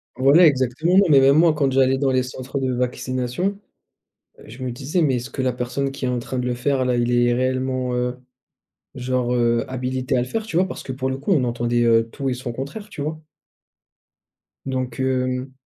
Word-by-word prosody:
Voilà 140 +7 +6
exactement, 140 +6 +1
mais 140 -3 +7
même 135 +2 +5
moi 165 0 +5
quand 140 -3 +1
j'allais 130 0 +3
dans 140 -1 +1
les 130 -1 +2
centres, 130 +1 -6
heu, - - -1
de 130 -1 0
vaccination. 125 +9 -2 0.8
Heu, - - -15
je 120 +4 -11
me 125 - -2
disais: 140 +8 -2
«Mais 140 -5 +2
est-ce 125 +2 -4
que 135 - -4
la 130 -1 0
personne 125 +3 -2
qui 135 - -5
est - - 0
en 125 -1 -1
train 130 +2 -5
de 125 - -1
le 125 - 0
faire 130 +2 0
là, 125 -1 +1
il 120 0 +1
est 120 0 +3
réellement, 130 0 -1
heu, 125 0 -1 0.8
genre, 125 -1 -1
heu, 120 -1 +2
habilité 130 0 -2
à - - +2
le 120 - -2
faire?» 220 - -3
Tu 170 - -4
vois? 185 +2 +3
Parce - - -7
que 130 - -6
pour 130 0 -3
le 130 - -2
coup, 140 +9 -1
on 145 -8 +3
entendait, 120 0 0
heu, 115 -1 +3
tout 135 +2 -4
et 130 - 0
son 125 -1 -5
contraire, 140 - -7
tu 150 - -8
vois? 155 +2 -3 1.5
Donc, 130 -2 -3
hem 130 0 -1
130 Hz, 220 wpm, -22 LUFS, 125-135 Hz, 1.5 s, mais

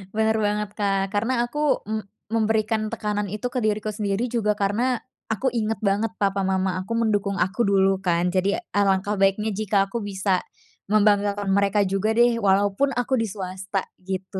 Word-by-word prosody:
Bener 220 0 +2
banget, 210 0 0
Kak, 195 -1 0
karena 235 +4 +1
aku 295 +4 0
m 215 -1 -2 0.2
memberikan 220 0 0
tekanan 210 -2 -2
itu 215 +4 -3
ke 250 +1 -2
diriku 215 0 0
sendiri 205 +3 -1
juga 225 -3 0
karena, 225 +5 0 0.3
aku 240 +4 0
inget 220 -3 -1
banget 210 +2 0
papa 195 -1 0
mama 190 -1 0
aku 205 +5 -4
mendukung 205 -3 +1
aku 195 +6 +1
dulu 195 -1 +3
kan, 175 -1 +1
jadi 190 +2 +1
alangkah 200 0 +1
baiknya 195 +3 +2
jika 200 -1 +1
aku 235 - -2
bisa 195 -2 0 0.5
membanggakan 205 -1 +2
mereka 200 +1 +3
juga 195 +3 0
deh 240 0 +4
walaupun 205 +6 +2
aku 245 0 0
di 225 - 0
swasta 190 0 -4 0.2
gitu 190 +1 -5
205 Hz, 165 wpm, -24 LUFS, 195-220 Hz, 0.5 s, deh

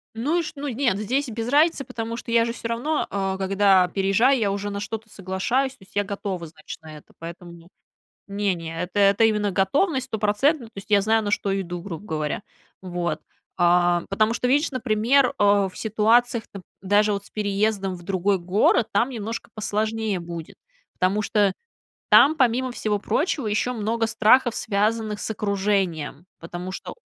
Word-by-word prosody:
Ну 280 +10 0
и - - -1
ш - - -6
ну 290 0 -5
нет, 245 -5 0
здесь 255 +7 -1
без 225 +1 -4
разницы, 300 +1 +3
потому 230 -2 -5
что 235 - -7
я 230 0 +4
же 230 - -3
всё 235 - -6
равно 270 +7 -1
а, 195 -1 -2
когда 195 -1 +3
переезжаю, 200 +8 +2
я 205 -3 +1
уже 200 +1 -3
на 200 - -4
что-то 225 +2 -5
соглашаюсь. 210 +8 -1
То 240 - -19
есть, 190 - -22
я 205 - +2
готова, 195 -3 -5
значит, 155 0 -11
на 155 -1 -11
это, 150 - -18
поэтому 170 0 -10 0.6
Не-не, 180 -5 -2
это 180 +3 -3
это 200 +2 +4
именно 210 -2 +2
готовность 260 - +1
стопроцентно. 225 +6 +1
То 225 - -15
есть, 195 +1 -9
я 205 -1 +5
знаю, 220 +2 +2
на 205 - -2
что 195 -1 0
иду, 175 -2 -5
грубо 185 +1 -7
говоря. 155 +2 -3 0.4
Вот, 175 -3 -3 0.4
а 175 -1 +3
потому 215 +3 +2
что, 250 - -1
видишь, 295 +4 +2
например 255 +2 +2
а, 200 -1 +3
в 185 - -14
ситуациях 225 +2 +2
нап 195 -2 -8 0.2
даже 205 +2 +3
вот 200 0 -4
с - - -16
переездом 200 -2 -1
в 175 - -12
другой 195 +1 +1
город, 190 +5 +2
там 220 +6 +2
немножко 225 -2 -5
посложнее 215 -1 -1
будет. 170 -1 -8 0.4
Потому 190 +3 +2
что 205 -2 +2 0.6
там, 300 +3 +7
помимо 255 -2 +1
всего 215 -3 -1
прочего, 290 - -1
ещё 215 +4 0
много 225 +1 -1
страхов, 225 +2 +4
связанных 215 0 -1
с - - -4
окружением. 195 -7 -1
Потому 175 +2 -7
что - - -7
205 Hz, 175 wpm, -24 LUFS, 190-230 Hz, 0.6 s, там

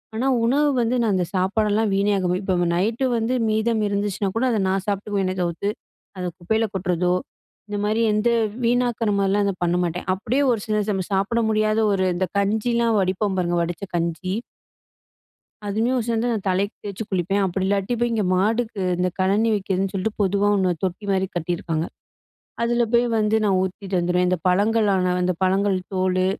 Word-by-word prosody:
ஆனா, 245 +4 0 0.2
உணவு 290 +5 +3
வந்து 235 +2 +1
நான் 220 -3 +1
அந்த 180 -1 +1
சாப்பாடெல்லாம் 210 +3 +1
வீண் 200 +1 +2
ஆகுறமாரி 180 -1 0
இப்ப 190 -1 0 0.2
நைட்டு 225 +8 0
வந்து 230 +2 0 0.2
மீதம் 220 +1 +1
இருந்துச்சுனா 200 0 -1
கூட 245 - +1
அத 225 - +1
நான் 190 0 0
சாப்பிட்டுக்குவேன் 200 -2 -1
தவித்து, 175 +3 -1 0.5
அத 185 - -4 0.2
குப்பையில 220 +6 0
கொட்டுறதோ, 180 -2 0 0.6
இந்த 205 - -3
மாதிரி 215 +2 +1
எந்த 210 +3 +2 0.4
வீணாக்குற 240 -2 +1
மாரிலாம் 200 +1 +2
அத 200 - 0
பண்ண 175 0 +1
மாட்டேன். 175 +1 -3
அப்பிடியே 240 +9 0
ஒரு 230 - 0
சில 215 -1 +1
ச - - -1
நம்ம 190 -2 -2
சாப்பிட 195 +5 +1
முடியாத 215 0 +2
ஒரு 190 -1 +1
இந்த 185 +1 0
கஞ்சியில 230 +4 +1
வடிப்போம் 190 +1 0
பாருங்க. 175 -1 0
வடிச்ச 170 +2 -5
கஞ்சி 170 +2 -2 1.3
அதுவுமே 220 +5 0
ஒ - - +1
சேர்ந்து 230 0 0
நான் 215 -4 -3
தலைக்கு 195 +3 0
தேய்ச்சு 205 +1 -5
குளிப்பேன். 195 +2 0
அப்படி 190 0 -1
இல்லாட்டி 200 +3 0
போய் 240 0 +1
இங்க 220 -3 0
மாட்டுக்கு 220 +3 0 0.2
இந்த 180 +1 +1
கழனி 200 +4 +2
வைக்கிறதுன்னு 195 -1 -1
சொல்லிட்டு 205 +2 -3
பொதுவா 200 +1 +2
1 185 -2 +2
தொட்டி 190 +2 -3
மாரி 190 -1 +1
கட்டியிருக்காங்க. 165 -1 -2 0.8
அதில 240 +1 +2
போய் 240 +1 +4
வந்து 215 0 +2
நான் 195 -3 +2
ஊத்திட்டு 190 +1 -4
வந்துருவேன். 180 +1 +1
இந்த 185 0 +1
பழங்களான 200 -1 +2
அந்த 180 0 +1
பழங்கள் 190 +1 +2 0.2
தோல் 185 0 +1
200 Hz, 170 wpm, -22 LUFS, 185-220 Hz, 1.3 s, போய்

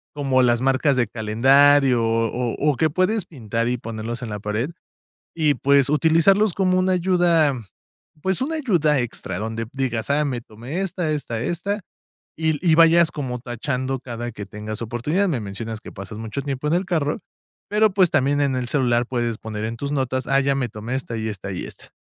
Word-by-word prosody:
como 135 -3 +2
las 120 -1 +3
marcas 135 +1 +2
de 120 -3 +2
calendario 130 +4 +4
o 115 +1 0
o 150 +1 +3
o - - -3
que 160 - +2
puedes 185 +6 +1
pintar 115 -5 -3
y 125 - 0
ponerlos 115 +1 -5
en 115 - -5
la 105 -1 -4
pared, 105 +8 -2 0.7
y 155 -3 +3
pues 140 -1 +3
utilizarlos 165 +6 +4
como 185 -1 +2
una 185 0 +2
ayuda, 175 -4 +3 0.7
pues, 190 -1 0
una 310 +5 -2
ayuda 170 - +2
extra, 100 -6 -4
donde 110 +1 -4
digas: 125 -4 -2
"Ah, 150 +1 +3
me 130 -4 -2
tomé 120 - -6
esta, 175 -3 -2
esta, 120 -7 -3
esta", 195 - -2 0.6
y 160 0 +1
l 150 - -3
y 170 -3 +4
vayas 165 0 +6
como 130 -4 -4
tachando 130 +2 -3
cada 120 -1 -6
que 105 -2 -7
tengas 105 +1 -7
oportunidad. 145 - 0
Me 135 - -1
mencionas 110 +2 -6
que - - -10
pasas 100 +1 -8
mucho 110 +5 -4
tiempo 140 +1 -3
en 150 - +1
el 185 +2 0
carro, 160 -3 -1 0.5
pero, 210 0 +3
pues, 185 -4 +4
también 140 +2 +2
en 135 -2 +1
el 125 -1 -2
celular 120 -3 +1
puedes 120 -3 -1
poner 110 -1 -5
en 115 +1 -4
tus 140 +2 -4
notas: 130 -2 -1
"Ah, 135 - +3
ya 140 0 +1
me 125 -3 -1
tomé 110 +4 -6
esta 120 -3 -4
y 110 0 -3
esta 100 -1 -6
y - - -4
esta". - - -13
135 Hz, 200 wpm, -22 LUFS, 115-160 Hz, 0.7 s, vayas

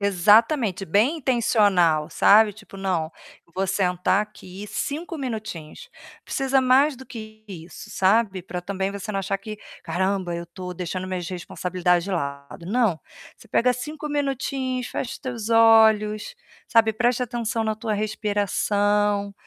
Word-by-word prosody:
Exatamente, 205 - +3
bem 215 - +2
intencional, 200 - +2
sabe, 210 +5 +5
tipo: 210 -1 -14
"Não, 180 -5 -1 0.4
vou 195 +1 0
sentar 180 0 +1
aqui 205 -1 -10
5 330 - -4
minutinhos". 220 - -6 0.4
Precisa 270 -1 +1
mais 265 +3 +4
do 265 +1 -12
que 215 -2 -10
isso, 175 -4 -10
sabe? 195 -1 +1
Pra 180 0 -5
também 190 +1 -3
você 200 +1 -6
não 195 - -1
achar 195 +1 -2
que: 215 +1 -8 0.3
"Caramba, 190 -1 -1
eu 170 0 -5
tô 180 +1 -8
deixando 180 +1 -4
minhas 185 -2 -4
responsabilidades 180 0 -1
de 200 - -5
lado". 140 -1 -5
Não, 215 -5 +1 0.4
você - - -18
pega 250 +1 +2
5 300 +5 -6
minutinhos, 270 -3 -2
fecha 240 - -4
teus 240 -5 -5
olhos, 220 - +4 0.3
sabe, 225 -1 +4
presta 245 +3 +1
atenção 235 -1 -2
na 220 -1 -1
tua 220 -1 -2
respiração, 205 -1 0
210 Hz, 140 wpm, -24 LUFS, 185-235 Hz, 0.4 s, sabe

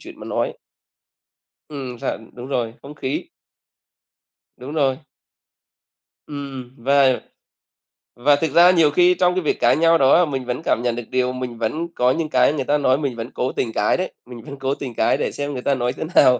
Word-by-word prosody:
chuyện - - -12
mà - - -8
nói. - - -1 1.2
Ừm, 130 -5 -6
thật, - - -2
đúng 125 +1 -9
rồi, 120 -4 -2
không 145 +2 -10
khí. 135 -1 -4 1.3
Đúng 130 +4 -8
rồi. 135 -3 +1 1.3
Ừm, 135 -4 -7
và 135 +1 +3 1.0
và 145 +4 +4
thực 155 0 -1
ra 175 +3 +7
nhiều 160 -5 +4
khi 180 +3 +4
trong 180 0 +2
cái 185 - +1
việc 150 - -1
cãi - - +4
nhau 165 0 +4
đó 135 -2 +4
á 175 - +5
mình 135 -4 -4
vẫn 125 +4 -3
cảm 115 - +1
nhận 120 -1 0
được 120 - -5
điều 125 0 0
mình 125 -2 -5
vẫn 155 +10 -2
có 125 +1 +3
những 160 +1 -2
cái 130 +2 +3
người 140 -3 -2
ta 150 - +2
nói 130 -2 +2
mình 140 -5 -3
vẫn 115 +3 -6
cố 125 - -2
tình 115 -3 -3
cãi 105 - +1
đấy, 185 - -3
mình 120 -2 -10
vẫn 140 -2 -10
cố 135 +1 -1
tình 130 -5 -6
cãi - - +2
để - - -2
xem 145 0 -4
người 125 - -4
ta 140 - +1
nói 125 -1 -1
thế - - -5
nào. 125 -2 +6
135 Hz, 210 wpm, -21 LUFS, 125-150 Hz, 1.3 s, ra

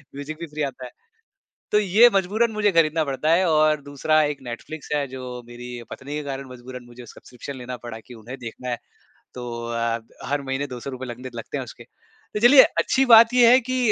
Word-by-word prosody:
music 145 +2 -6
भी 170 - -6
free 150 - -4
आता 130 -2 -5
है, - - -10 0.8
तो 210 - +5
ये 210 +4 +6
मजबूरन 205 +5 +1
मुझे 210 -1 +2
खरीदना 160 -1 +3
पड़ता 140 +2 -1
है 185 +3 +4
और 155 -1 +3
दूसरा 145 +2 +1
एक 145 -1 -1
नेटफ्लिक्स 130 +5 -8
है 145 -1 0
जो 125 -1 -7
मेरी 120 0 -10 0.2
पत्नी 140 +3 -8
के 150 - -3
कारण 135 -1 -6
मजबूरन 125 0 -10
मुझे 120 0 -13
सब्सक्रिप्शन 125 +4 -10
लेना 125 0 -6
पड़ा 115 -1 -7
कि 125 - -12
उन्हें 120 +4 -10
देखना 125 +2 -7
है 120 - -1 0.6
तो 125 - -7 0.2
अ, 115 0 -1 0.3
हर 145 0 -1
महीने 135 +1 -3
₹200 130 0 -7
लगते 125 +1 -7
लगते 115 - -5
हैं - - -3
उसके, - - -12
तो 210 - -11
चलिए, 260 +4 +8
अच्छी 270 0 +1
बात 230 +2 +8
ये 240 -2 +6
है 255 - +7
कि 255 - 0
140 Hz, 205 wpm, -23 LUFS, 125-165 Hz, 0.8 s, चलिए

